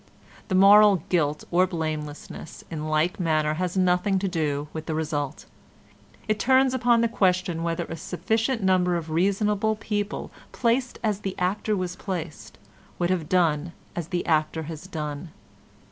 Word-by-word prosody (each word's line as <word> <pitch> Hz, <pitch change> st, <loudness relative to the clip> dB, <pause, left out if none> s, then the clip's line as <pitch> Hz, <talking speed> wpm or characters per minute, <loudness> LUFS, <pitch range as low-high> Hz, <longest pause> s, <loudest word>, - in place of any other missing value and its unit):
The 185 Hz, -, 0 dB
moral 200 Hz, -2 st, +7 dB
guilt 150 Hz, -4 st, +1 dB
or 180 Hz, +2 st, +4 dB
blamelessness 155 Hz, -3 st, -5 dB
in 155 Hz, -1 st, -4 dB
like 155 Hz, +5 st, +1 dB
manner 155 Hz, -3 st, +1 dB
has 180 Hz, +3 st, -2 dB
nothing 185 Hz, +1 st, +2 dB
to 195 Hz, +1 st, -1 dB
do 150 Hz, -5 st, -1 dB
with 160 Hz, 0 st, -6 dB
the 160 Hz, -, -1 dB
result; 150 Hz, -2 st, -3 dB, 0.8 s
it 215 Hz, -1 st, 0 dB
turns 260 Hz, +3 st, +4 dB
upon 240 Hz, -2 st, +3 dB
the 235 Hz, -, +3 dB
question 185 Hz, -6 st, +1 dB
whether 165 Hz, 0 st, -1 dB
a 165 Hz, -, -6 dB
sufficient 220 Hz, -, -1 dB
number 180 Hz, -2 st, +3 dB
of 160 Hz, -1 st, -6 dB
reasonable 205 Hz, +5 st, +1 dB
people 210 Hz, -1 st, -3 dB, 0.2 s
placed 245 Hz, +1 st, 0 dB
as 210 Hz, -3 st, 0 dB
the 195 Hz, -2 st, -5 dB
actor 200 Hz, +3 st, 0 dB
was 180 Hz, -1 st, -3 dB
placed 165 Hz, -, -6 dB, 0.4 s
would 175 Hz, 0 st, 0 dB
have 170 Hz, -5 st, -1 dB
done 170 Hz, -2 st, +1 dB, 0.2 s
as 170 Hz, -3 st, -3 dB
the 175 Hz, -1 st, -2 dB
actor 155 Hz, 0 st, +1 dB
has 160 Hz, +3 st, -8 dB
done. 150 Hz, -2 st, -5 dB
180 Hz, 155 wpm, -25 LUFS, 160-200 Hz, 0.8 s, moral